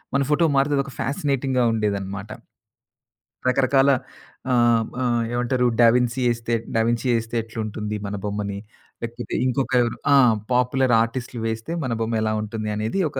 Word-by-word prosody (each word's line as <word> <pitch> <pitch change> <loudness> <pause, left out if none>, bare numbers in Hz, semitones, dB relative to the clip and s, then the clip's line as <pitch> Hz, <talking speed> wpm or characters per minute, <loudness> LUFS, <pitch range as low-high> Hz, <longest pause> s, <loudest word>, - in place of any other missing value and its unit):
మన 140 - +3
ఫోటో 165 +3 +3
మారితే 140 +1 +2
అదొక 140 0 -3
ఫ్యాసనేటింగ్‌గా 135 -2 0
ఉండేదనమాట. 100 -1 -2 1.2
రకరకాల 135 +1 +3 0.6
ఆహ్, 120 -2 +3 0.2
ఆహ్, 120 -1 +1
ఏమంటారు 125 +1 0 0.2
'డవిన్సీ' 125 +2 +3
ఎస్తే, 115 0 -3 0.2
'డవిన్సీ' 120 +2 +1
ఎస్తే 115 +1 -7
ఎట్లుంటుంది 110 -1 -5
మన 100 +1 -4
బొమ్మని. 100 -1 -3 0.4
లేకపోతే 120 +1 -5
ఇంకొక 130 +1 0
ఎవరు 120 -1 -1 0.2
ఆ! - - +7 0.4
పాపులర్ 125 0 +2
ఆర్టిస్ట్‌లు 120 +1 -3
వేస్తే 110 +8 -4
మన 125 -3 -1
బొమ్మ 115 0 -1
ఎలా 110 0 0
ఉంటుంది 110 0 -4
అనేది 110 - -2
ఒక 135 - -5
120 Hz, 135 wpm, -23 LUFS, 110-130 Hz, 1.2 s, ఆ